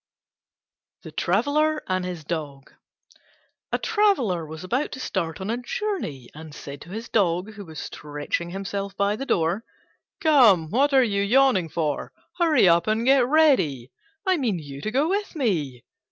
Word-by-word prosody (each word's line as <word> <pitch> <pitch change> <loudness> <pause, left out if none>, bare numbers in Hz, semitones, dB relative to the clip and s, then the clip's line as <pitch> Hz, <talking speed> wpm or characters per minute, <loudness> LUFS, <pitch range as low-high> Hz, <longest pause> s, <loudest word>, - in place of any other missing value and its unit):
THE - - -9
TRAVELLER 305 +1 +1
AND 185 -1 -1
HIS 175 -3 -5
DOG 145 -4 -6 1.0
A - - +1
Traveller 270 - +1
was 160 +3 -8
about 250 +10 -1
to 260 - -7
start 170 -9 -3
on 190 +3 -3
a 235 - -1
journey, 245 - -4
and 155 -1 -11
said 140 -1 -9
to - - -12
his 220 +5 -6
Dog, 185 0 0
who 200 -1 -9
was 160 -2 -11
stretching 150 +3 -4
himself 195 +1 -5
by 200 +1 +1
the 270 +5 -6
door, 170 +6 +1 0.6
"Come, 235 - +5
what 280 +5 +3
are 265 -1 +5
you 200 -4 0
yawning 210 -5 +3
for? 150 -3 -2 0.3
Hurry 325 - +4
up 170 0 +4
and 220 +2 +1
get 265 -2 +5
ready: 255 - +3 0.3
I 375 -1 +3
mean 235 - 0
you 140 -3 -8
to 215 - -2
go 275 +7 +1
with 400 +1 -2
me." 155 - -1
200 Hz, 165 wpm, -24 LUFS, 160-270 Hz, 1.0 s, Come